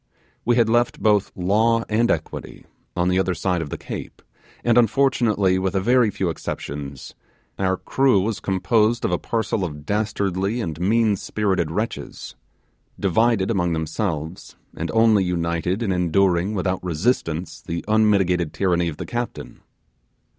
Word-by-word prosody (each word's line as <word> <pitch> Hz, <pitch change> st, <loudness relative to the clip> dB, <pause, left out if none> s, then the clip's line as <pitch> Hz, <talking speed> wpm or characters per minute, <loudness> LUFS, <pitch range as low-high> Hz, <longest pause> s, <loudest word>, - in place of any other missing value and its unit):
We 120 Hz, -, +3 dB
had 115 Hz, -2 st, +4 dB
left 120 Hz, +1 st, +1 dB
both 105 Hz, -2 st, +2 dB
law 110 Hz, +5 st, +2 dB
and 115 Hz, +2 st, +1 dB
equity 80 Hz, -, -4 dB, 0.3 s
on 90 Hz, 0 st, +1 dB
the 90 Hz, 0 st, +2 dB
other 95 Hz, -1 st, 0 dB
side 90 Hz, -1 st, -1 dB
of 75 Hz, -, -5 dB
the -, -, -5 dB
Cape; -, -, -8 dB, 0.4 s
and 120 Hz, -1 st, +3 dB
unfortunately, 115 Hz, -6 st, +3 dB
with 95 Hz, 0 st, -1 dB
a -, -, +3 dB
very 120 Hz, +3 st, +3 dB
few 95 Hz, -3 st, -2 dB
exceptions, 70 Hz, -4 st, -6 dB, 0.5 s
our 95 Hz, -1 st, +1 dB
crew 135 Hz, -2 st, +2 dB
was 105 Hz, +3 st, -1 dB
composed 110 Hz, +4 st, +1 dB
of -, -, 0 dB
a 90 Hz, -, 0 dB
parcel 110 Hz, -3 st, -1 dB
of 75 Hz, -4 st, -6 dB
dastardly 100 Hz, 0 st, -1 dB
and 80 Hz, -8 st, -4 dB
meanspirited 100 Hz, -3 st, +1 dB
wretches, 85 Hz, -5 st, -5 dB, 0.6 s
divided 110 Hz, +2 st, +2 dB
among 90 Hz, -5 st, 0 dB
themselves, 80 Hz, 0 st, -3 dB, 0.2 s
and -, -, -4 dB
only 110 Hz, -3 st, +4 dB
united 90 Hz, +3 st, -1 dB
in 100 Hz, -, 0 dB
enduring 90 Hz, +2 st, +1 dB
without 95 Hz, -1 st, -1 dB
resistance 85 Hz, -1 st, -1 dB
the 85 Hz, 0 st, -5 dB
unmitigated 100 Hz, -6 st, +2 dB
tyranny 85 Hz, -3 st, +1 dB
of 80 Hz, -3 st, -5 dB
the -, -, -5 dB
captain. 120 Hz, 0 st, -5 dB
95 Hz, 145 wpm, -22 LUFS, 90-110 Hz, 0.6 s, had